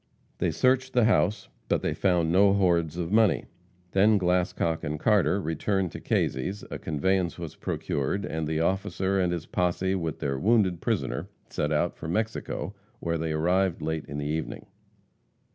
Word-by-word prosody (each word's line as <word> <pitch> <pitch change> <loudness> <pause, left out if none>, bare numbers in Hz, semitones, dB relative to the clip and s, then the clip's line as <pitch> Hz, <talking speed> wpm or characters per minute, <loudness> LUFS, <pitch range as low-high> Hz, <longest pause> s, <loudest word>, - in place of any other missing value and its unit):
They - - +1
searched 130 0 +2
the 125 - +4
house, 105 -2 +2 0.2
but - - 0
they - - 0
found 90 -4 +2
no 100 +2 +5
hoards 85 -4 +2
of 85 0 -3
money. 110 -4 +3 0.5
Then 105 +2 +5
Glascock 90 -3 0
and 75 +1 -3
Carter 105 -1 +3
returned 95 +2 -1
to - - -7
Kazy's, 95 +11 -1
a - - -4
conveyance 85 +3 0
was 85 -3 -7
procured, 70 +8 -2
and 80 0 -3
the 80 +1 0
officer 95 +2 0
and 90 -2 +1
his 85 -2 -3
posse 90 +1 0
with 80 -5 -2
their 70 -1 -2
wounded 100 - +2
prisoner - - -1 0.2
set 75 - -1
out 75 - +1
for - - -7
Mexico, 105 +1 -2 0.3
where 85 -1 -1
they 80 0 -2
arrived 85 +2 +1
late 80 0 -2
in 70 - -6
the 75 - -3
evening. 80 +2 -3
90 Hz, 165 wpm, -27 LUFS, 80-95 Hz, 0.5 s, no